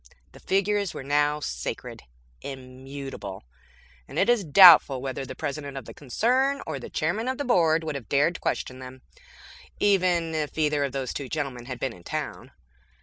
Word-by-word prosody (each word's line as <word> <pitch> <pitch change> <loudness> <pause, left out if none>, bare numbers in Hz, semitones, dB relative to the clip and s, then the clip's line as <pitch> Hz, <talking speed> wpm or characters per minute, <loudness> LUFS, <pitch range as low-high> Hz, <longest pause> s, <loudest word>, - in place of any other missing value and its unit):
The - - -15
figures 200 0 0
were - - -6
now 145 +2 +1
sacred; 65 - -5 0.4
immutable; 130 - -8 0.6
and - - -9
it 200 - +2
is 240 -4 +3
doubtful 160 -5 +8
whether 135 0 -5
the 130 - -7
President 145 -1 -5
of 135 - -7
the - - -10
concern 255 - +1
or - - -4
the - - -9
Chairman 225 +3 -1
of 260 0 -1
the 285 - -3
Board 165 -8 +3
would 155 -1 -3
have 135 -6 -7
dared 145 +5 +2
question 130 0 -3
them 130 0 -11 0.8
even 180 -5 +2
if 155 -1 -3
either 150 -2 +1
of 140 - -2
those 135 -2 -3
two 140 -3 -5
gentlemen 135 -6 -4
had 125 -2 -6
been 130 -3 -2
in 90 - -16
town. - - -5
145 Hz, 175 wpm, -26 LUFS, 130-180 Hz, 0.8 s, doubtful